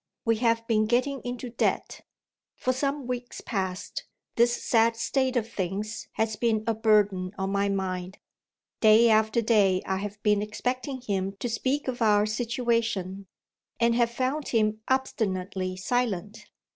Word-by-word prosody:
We 230 -1 +2
have 230 0 +1
been 215 -2 +2
getting 255 +4 +1
into 245 0 -5
debt. 230 - -1 0.5
For 255 - 0
some 275 +1 -2
weeks 245 0 -5
past, 190 -3 -4 0.3
this 240 +1 +2
sad 230 0 +3
state 260 +3 0
of 230 -3 0
things 200 +2 -4
has 220 0 0
been 220 0 +1
a 230 - +1
burden 205 -4 +2
on 190 0 -2
my 200 0 +1
mind. 185 -1 -3 0.6
Day 225 +1 +6
after 220 +1 +3
day 200 -5 +3
I 190 - -1
have 205 +1 -5
been 210 -1 +3
expecting 250 +5 -3
him 195 -4 -2
to 200 +5 -4
speak 260 +5 -1
of 250 -2 -3
our 210 -2 +4
situation, 225 -4 -1 0.5
and 235 0 +3
have 235 0 +3
found 260 +5 -2
him 215 -2 +1
obstinately 190 -7 -1
silent. 210 -1 -2
220 Hz, 145 wpm, -27 LUFS, 200-245 Hz, 0.6 s, Day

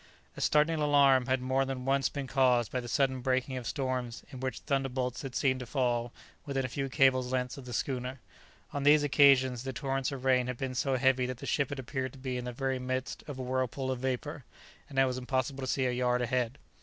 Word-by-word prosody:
A - - -7
startling 155 +1 +3
alarm 140 -3 +5
had 130 -1 +1
more 130 +1 +2
than 130 -1 -4
once 135 -1 +2
been 140 +1 -4
caused 125 -3 +2
by 130 - -1
the 120 - -6
sudden 130 0 +1
breaking 130 +1 0
of 125 -2 -5
storms 130 -4 -3
in 130 - -8
which 130 -2 -3
thunderbolts 130 -3 -1
had 135 -3 -7
seemed 130 -2 +2
to 125 - -7
fall 120 -2 0 0.3
within 135 -2 -2
a - - -3
few 135 +2 -3
cables' 130 -2 +3
lengths 125 -1 -1
of 140 - -10
the 125 - -8
schooner. 130 +2 -3 0.5
On 145 - -2
these 145 +1 +6
occasions 135 -4 +5
the 130 +1 -5
torrents 135 +1 -2
of 135 -2 -6
rain 125 -1 +3
had 125 -1 -3
been 130 0 -3
so 130 +1 0
heavy 130 -1 +3
that 130 -1 -4
the - - -8
ship 140 -3 0
had 140 - -5
appeared 130 0 -4
to - - -12
be 130 -1 -4
in 125 0 -4
the 125 - -3
very 130 +1 -2
midst 130 +1 -3
of 145 -3 -6
a 130 - -4
whirlpool 130 +1 -1
of 130 - -3
vapour, 130 +3 -3 0.5
and 135 - -9
it 135 - +6
was 130 -1 -2
impossible 130 +1 -2
to 130 - -3
see 130 - 0
a 125 - +1
yard 125 0 +1
ahead. 125 +1 -1
130 Hz, 235 wpm, -30 LUFS, 125-135 Hz, 0.5 s, these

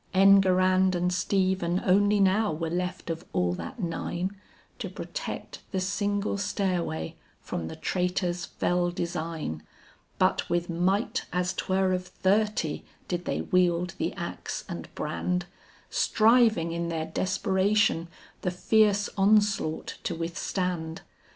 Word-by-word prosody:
Enguerrand 185 -1 +5
and 180 +1 +1
Stephen 185 -2 +1
only 205 +2 +4
now 200 +2 +3
were 160 +1 -3
left 180 0 -2
of 165 +1 -5
all 90 0 +1
that 160 - -7
nine, 175 +1 -2 0.4
To - - -4
protect - - -6
the 190 - 0
single 200 +2 -1
stairway 180 - -1 0.2
from 80 - -4
the - - -6
traitor's 180 -1 -1
fell 175 0 0
design; 165 - -3 0.6
But - - +2
with 175 0 0
might 185 +6 0
as 180 0 0
'twere 190 0 +1
of 185 0 -2
thirty, 205 -5 0 0.2
did 175 -1 -3
they - - -1
wield 180 -1 +2
the - - 0
axe - - -5
and - - -6
brand, 180 -1 -1 0.5
Striving 220 -6 +4
in 170 0 -2
their 160 -1 -2
desperation 190 +1 +1 0.3
the 180 - 0
fierce 205 +2 +3
onslaught 200 -5 +2
to 170 - -1
withstand. 165 0 -3
185 Hz, 125 wpm, -27 LUFS, 170-195 Hz, 0.6 s, Enguerrand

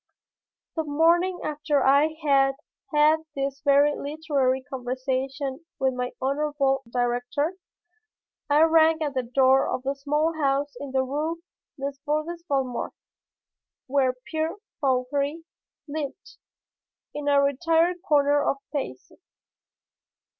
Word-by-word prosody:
The 320 - 0
morning 335 +5 +2
after 295 -2 0
I 285 +4 +4
had 270 -1 +4 0.4
had 305 +1 +4 0.2
this 275 0 -3
very 285 0 +5
literary 280 -3 -1
conversation 265 +2 -3
with 265 -1 +1
my 250 0 -2
honorable 275 0 0
director, 245 +6 -1 1.0
I 295 +2 +5
rang 320 0 +4
at 290 -2 -2
the 260 - 0
door 260 +2 +3
of 255 - -2
the 275 +1 0
small 295 +4 0
house 280 +1 +1
in 285 - -6
the 265 0 +2
Rue 310 +5 -3 0.4
Desbordes 300 +5 -3
Valmore 265 -4 -1 0.9
where 260 -1 +1
Pierre 315 0 -2 0.2
Fauchery 280 +4 0 0.4
lived, 300 +4 -6 0.8
in 295 -1 -5
a 285 -1 +5
retired 325 +5 +2
corner 290 -4 +3
of 275 - +1 0.2
Passy. 260 - -5
285 Hz, 110 wpm, -25 LUFS, 265-305 Hz, 1.0 s, very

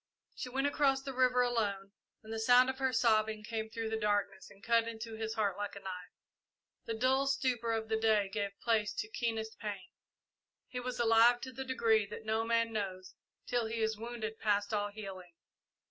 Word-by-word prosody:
She 250 - -5
went 270 +2 -1
across 275 -2 +2
the 270 -1 -5
river 250 -1 +3
alone, 205 -5 -1 0.3
and 220 +1 -7
the 225 - -3
sound 250 +3 +6
of 265 - -12
her 265 -1 +1
sobbing 220 -2 +2
came 220 0 -4
through 225 0 -4
the 220 - 0
darkness 205 -2 -1
and 200 0 -18
cut 230 -1 +3
into 225 0 -6
his 220 0 -4
heart 200 -4 0
like 205 0 -4
a - - -7
knife. 180 -2 -8 0.7
The 230 - -3
dull 260 +4 +2
stupor 255 -4 0
of 220 -1 -1
the 220 0 +1
day 220 -2 +3
gave 200 0 -4
place 220 -3 +2
to - - -3
keenest 220 -1 -3
pain. 200 -4 -6 0.8
He 250 - -5
was 250 0 -4
alive 235 +1 +5
to 260 - -6
the 265 +2 -5
degree 225 -5 +2
that 220 - -8
no 220 +1 +1
man 230 0 +1
knows 185 -3 -4 0.3
till 240 -2 0
he 225 0 -3
is 220 0 +1
wounded 225 0 -5
past 205 0 +1
all 205 -1 0
healing. 195 -4 -9
220 Hz, 195 wpm, -33 LUFS, 210-240 Hz, 0.8 s, sound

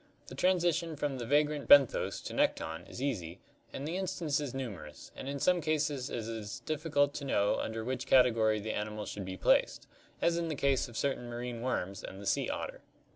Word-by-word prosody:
The - - -9
transition 170 -3 +1
from 145 -3 -2
the 120 - -4
vagrant 145 +1 +2
benthos 140 -3 +6
to - - -6
nekton 80 0 -1
is 130 - -6
easy 95 -10 -3 0.3
and 140 - -5
the 170 +3 -2
instances 160 -7 -1
numerous, 100 - -7
and 135 - -6
in 140 - -3
some 180 +5 +2
cases 150 -4 0
it 115 -2 -4
is 110 -3 -5
difficult 145 -2 +1
to 145 - -5
know 100 -7 +1
under 110 0 -3
which 130 +3 -3
category 115 -4 +4
the 110 +1 -3
animal 105 0 -3
should 100 -2 -5
be 95 0 -6
placed, - - +2 0.3
as 170 0 +2
in 170 - -1
the 155 - -2
case 140 -2 +1
of 120 -2 -9
certain 130 -3 -1
marine 120 0 -5
worms 100 -6 -2
and 95 - -8
the 100 - -9
sea - - +1
otter. - - -4
130 Hz, 195 wpm, -32 LUFS, 110-150 Hz, 0.3 s, benthos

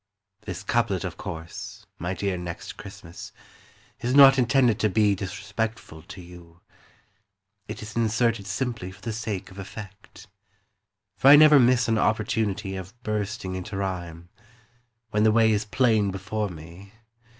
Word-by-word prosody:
This 95 -1 -5
couplet, 105 -4 0
of 90 -4 -5
course. 85 -4 -8
My 90 +3 -3
dear 95 +1 -2
Next 90 -1 -7
Christmas, 85 +1 -11 0.7
Is 125 +2 -1
not 135 -1 +8
intended 125 -3 +3
to 110 - +2
be 105 0 +3
Disrespectful 100 -2 -5
to 95 - -12
you; 85 -1 -14 1.1
It 110 - -7
is 105 0 -9
inserted 115 -2 0
simply 115 -3 -3
For 95 - -16
the 115 - -4
sake 105 -4 -5
of 95 - -11
effect. 100 +1 -11 0.9
For 135 - +3
I 140 - +11
never 150 -1 +8
miss 125 0 +4
an 115 -1 +1
opportunity 105 -3 -1
Of 95 +6 -9
bursting 105 -2 -3
into 95 +2 -5
rhyme. 85 -3 -5 0.8
When 105 - +1
the 110 0 +5
way 110 0 +4
is 105 0 0
plain 110 -3 +2
before 100 +2 -3
me. 85 +4 -12
105 Hz, 145 wpm, -25 LUFS, 95-115 Hz, 1.1 s, I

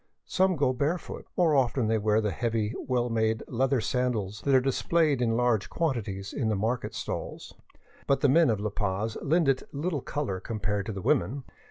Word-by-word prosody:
Some 190 -1 +2
go 140 -4 +2
barefoot; 145 +7 -3
more 165 -4 +4
often 130 -2 +2
they 110 0 +2
wear 105 +1 +2
the 105 -2 -1
heavy, 110 0 -1
well 125 -2 +1
made 110 -1 0
leather 130 +2 +1
sandals 110 -4 -1
that 140 -1 +2
are - - +7
displayed 140 +2 +1
in 115 -2 +1
large 120 -5 +1
quantities 105 - -2
in 115 -6 -1
the 110 - +1
market 115 +5 -2
stalls. - - -5 0.5
But 140 - +2
the 145 - +5
men 160 +3 +5
of 110 -3 +1
La 105 0 -2
Paz 105 +2 -2
lend 160 +1 +2
it 135 -1 +2
little 150 0 -2
color 130 -11 -3
compared 105 -1 -3
to - - -2
the 100 -3 -6
women. 130 +11 +1
120 Hz, 190 wpm, -28 LUFS, 110-140 Hz, 0.5 s, are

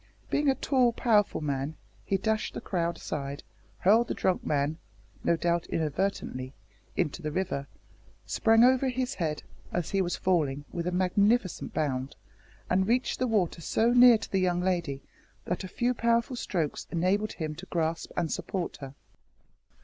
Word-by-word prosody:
Being 290 -1 +2
a 265 - +3
tall 255 -4 +2
powerful 210 -7 +2
man, 140 +1 -2 0.3
he 195 - 0
dashed 220 +2 -1
the - - -3
crowd 170 -2 -1
aside, 140 -1 -5 0.3
hurled 225 +5 +4
the - - -2
drunk 185 -1 0
man 150 +2 0 0.4
no 170 - +2
doubt 170 +1 0
inadvertently 150 -5 -2 0.4
into 175 0 -1
the 155 -1 -3
river, 160 -5 -2 0.6
sprang 225 +1 +4
over 260 +1 +4
his 255 +1 -2
head, 155 -4 -2 0.3
as 175 -2 -2
he 195 - +2
was 175 -1 -1
falling, 145 -6 0
with 170 0 -3
a - - 0
magnificent 195 +3 +1
bound, 135 -3 -1 0.5
and 190 +1 +2
reached 245 +3 +1
the 255 - +1
water 190 -7 0
so 230 +8 +2
near 245 -1 +8
to - - -9
the 195 - +2
young 180 -1 +1
lady 170 -7 -1 0.4
that 180 - -2
a - - -5
few 240 +6 0
powerful 235 +1 +1
strokes 170 -10 -2
enabled 185 +5 0
him 155 -3 -4
to 175 +5 -10
grasp 165 -1 -1
and 170 -3 0
support 185 -3 -3
her. 135 -1 -9
180 Hz, 165 wpm, -28 LUFS, 155-220 Hz, 0.6 s, near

